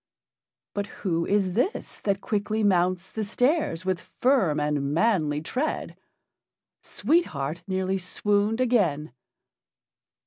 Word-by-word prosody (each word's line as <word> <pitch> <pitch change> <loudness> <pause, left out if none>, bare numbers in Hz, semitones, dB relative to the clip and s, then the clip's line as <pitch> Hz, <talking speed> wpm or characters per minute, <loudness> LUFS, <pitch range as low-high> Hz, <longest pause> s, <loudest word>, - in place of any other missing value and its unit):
But 205 0 -2
who 170 -4 -2
is 195 -2 +2
this 250 - -1
that 200 -1 -1
quickly 215 +1 -1
mounts 185 -1 +2
the 220 - -3
stairs 245 - 0
with 185 -2 0
firm 215 - +1
and 145 -1 0
manly 165 -8 +2
tread? 260 - -2 0.9
Sweet 340 +2 +1
Heart 145 +3 -4
nearly 190 0 -1
swooned 205 +4 0
again. 180 - +1
195 Hz, 110 wpm, -26 LUFS, 165-220 Hz, 0.9 s, is